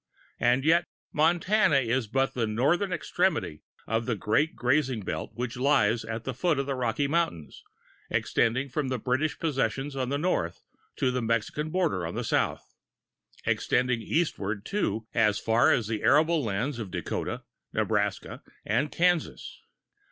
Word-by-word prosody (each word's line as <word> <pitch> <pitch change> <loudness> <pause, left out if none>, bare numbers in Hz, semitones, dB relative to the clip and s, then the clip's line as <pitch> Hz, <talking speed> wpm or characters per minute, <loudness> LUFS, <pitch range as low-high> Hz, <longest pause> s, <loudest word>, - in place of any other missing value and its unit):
And 120 +3 +3
yet 170 +2 +4 0.3
Montana 170 +3 +3
is 130 -2 +1
but 135 +4 0
the 115 -3 -1
northern 150 - +1
extremity 175 - -1 0.2
of 115 +1 -1
the 120 - +1
great 110 - +1
grazing 130 -2 +1
belt 95 - -4
which 120 +1 -4
lies 125 -4 +2
at 115 0 -5
the 130 - -3
foot 155 +4 +1
of 140 - 0
the 140 - -2
Rocky 130 +2 0
Mountains, 140 - -2 0.5
extending 125 +4 +1
from 140 +1 -2
the 130 0 -1
British 130 +6 -1
possessions 135 -2 -1
on 130 -2 -2
the 140 - 0
north 145 - -1 0.3
to 130 - +1
the 125 0 -1
Mexican 115 +7 -1
border 160 - 0
on 85 - -6
the - - -2
south, - - -1 0.7
extending 125 -2 +1
eastward, 110 - -1
too, 115 - -1
as 110 -3 +3
far 115 +1 +3
as 120 - +2
the 110 0 -3
arable 155 +2 +4
lands 115 +5 -2
of 105 -4 -5
Dakota, - - -4 0.3
Nebraska - - -1 0.2
and 130 +8 0
Kansas. 175 -1 0
130 Hz, 150 wpm, -27 LUFS, 115-155 Hz, 0.7 s, yet